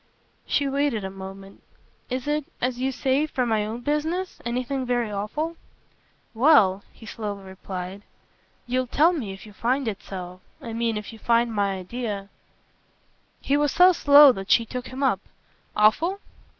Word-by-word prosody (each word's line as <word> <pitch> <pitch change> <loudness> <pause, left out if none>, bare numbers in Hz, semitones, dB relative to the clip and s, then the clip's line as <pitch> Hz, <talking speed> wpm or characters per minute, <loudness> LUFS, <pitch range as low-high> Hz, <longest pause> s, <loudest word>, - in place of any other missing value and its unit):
She 285 - +1
waited 275 -6 0
a 190 - -4
moment. 195 0 -10 0.5
"Is 255 +2 -3
it, 300 -1 0
as 250 0 -1
you 265 +1 0
say 270 +3 +1
for 255 -4 -1
my 220 -2 +1
own 230 +3 -5
business, 315 +7 -2
anything 250 +3 -2
very 240 -3 -1
awful?" 300 +12 -3 0.8
"Well," 220 -7 +5
he 225 - -15
slowly 205 -2 -5
replied, 190 0 -7 0.6
"you'll 255 +1 -1
tell 315 +8 +4
me 245 - -4
if 195 +1 -10
you 210 - -13
find 255 +4 0
it 205 -3 -3
so. 180 -1 -8 0.2
I 230 - -7
mean 230 -1 -1
if 210 +2 -7
you 225 - -12
find 235 0 +2
my 200 -2 0
idea 200 0 -5 0.6
" - - -40
He 280 - +3
was 290 -1 +2
so 360 +2 +7
slow 285 -3 +8
that 195 -4 -7
she 230 - +4
took 250 +2 -6
him 260 +2 -5
up. 250 -8 +2 0.6
"Awful?" 320 - +3
240 Hz, 165 wpm, -25 LUFS, 205-280 Hz, 0.8 s, slow